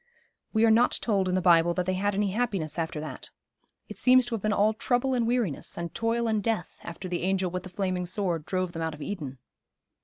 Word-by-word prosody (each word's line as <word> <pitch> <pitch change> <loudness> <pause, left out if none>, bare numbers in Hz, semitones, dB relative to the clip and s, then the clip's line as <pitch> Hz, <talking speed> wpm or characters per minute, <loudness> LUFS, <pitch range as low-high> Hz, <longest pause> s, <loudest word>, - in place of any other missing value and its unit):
'We 220 0 +3
are 225 - +5
not 235 +3 +4
told 195 -5 +1
in 180 - +1
the 185 - +1
Bible 170 -1 +5
that 180 - 0
they 185 - 0
had 200 +2 0
any 200 -1 +1
happiness 195 -8 -1
after 160 -2 -2
that. 155 - -7 0.6
It - - -9
seems 255 0 +6
to 240 - -5
have 225 - -2
been 215 - 0
all 210 +1 +3
trouble 245 +4 0
and 240 -2 +1
weariness, 235 - -1
and 170 -1 -4
toil 230 +1 0
and 215 -2 +1
death, 215 -5 -2
after 170 +2 -7
the 175 -1 -2
angel 185 -1 0
with 180 +1 -3
the 185 - -10
flaming 185 -1 -2
sword 180 -4 -1
drove 185 -1 -1
them 165 -2 -6
out 160 -1 -2
of 150 - -8
Eden.' 145 -10 -5
190 Hz, 235 wpm, -27 LUFS, 175-220 Hz, 0.6 s, seems